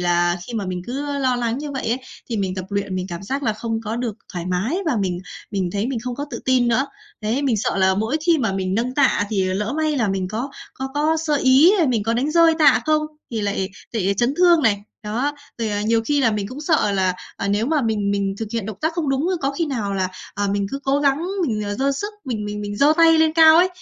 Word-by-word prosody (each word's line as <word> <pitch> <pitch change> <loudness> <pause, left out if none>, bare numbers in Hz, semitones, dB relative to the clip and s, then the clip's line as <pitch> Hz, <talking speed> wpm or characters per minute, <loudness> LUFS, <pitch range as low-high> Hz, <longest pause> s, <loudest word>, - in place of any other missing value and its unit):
là 175 0 +2
khi - - -8
mà 205 -4 -2
mình 180 -1 -4
cứ, 275 +4 -3
ơ, 285 -1 -2
lo 255 -2 +1
lắng 235 0 -1
như 295 0 -5
vậy 265 -4 -3
ấy, 240 - +1 0.3
thì 230 - -2
mình 190 -2 -1
tập 185 - -4
luyện, 200 -1 -2
mình 185 0 -3
cảm 175 +1 -6
giác 270 +7 -3
là 225 -5 +1
không 225 +1 -3
có 220 +2 -3
được 235 -4 -3 0.2
thoải 175 -1 -4
mái 185 - -1
và 295 - +1
mình 180 -2 -1 0.3
mình 190 -4 -1
thấy 205 +3 -1
mình 265 -3 -2
không 250 -1 -3
có 285 - -3
tự 235 - -4
tin 255 -2 +3
nữa. 255 +4 +2 0.3
Đấy, 225 +6 -1
mình 260 -5 +1
sợ 205 - -1
là 190 0 +3
mỗi 220 +9 0
khi 335 -2 +4
mà 225 -7 0
mình 190 -1 -1
nâng 240 +4 -1
tạ 270 -7 +3
thì 195 -3 +1
lỡ 195 +4 -1
may 310 -1 0
là 230 -6 +1
mình 190 -1 -1
có 235 +7 -4 0.2
có 265 0 -4
có 305 +2 +2
sơ 310 -2 0
ý, 275 +7 +6 0.2
mình 230 -5 +1
có 230 +2 0
đánh 265 +6 0
rơi 330 0 +5
tạ 305 - +5
không 310 0 +3 0.3
thì 225 -2 -2
lại 200 -2 -1 0.2
lại 200 -4 0
chấn 240 +7 +1
thương 345 -2 +5
này. 205 -5 +2 0.2
Đó. 240 +8 -1 0.3
Rồi, 225 -2 -1
à, 205 0 -1
nhiều 225 +1 +2
khi 290 +4 +1
là 230 - +3
mình 205 -2 -2
cũng 255 +5 -8
sợ 305 - +2
là, 190 -2 +1 0.2
à, 200 - -3
nếu 205 +3 +1
mà 300 0 +1
mình 215 -3 0
mình 200 -1 0
thực 225 - -3
hiện 230 -4 -2
động 220 -3 -6
tác 315 +1 0
không 325 -3 -2
đúng, 270 +5 +1
a, 370 - +1
có 275 - +1
khi 325 +4 -1
nào 220 -8 -2
là, 190 -1 0 0.3
à, 205 - -1
mình 200 0 0
cứ 275 - -3
cố 275 +1 +2
gắng 285 +4 +1 0.2
mình, 215 -3 -1
ờ, 205 0 -3
giơ 275 +5 +1
sức, 410 +10 -4
mình 230 -6 -3
mình 210 0 -4
mình 205 0 -5
giơ 285 +6 +5
tay 330 -1 +6
lên 320 0 +4
cao 320 0 +7
ấy, 360 +2 +5
230 Hz, 275 wpm, -21 LUFS, 200-280 Hz, 0.3 s, cao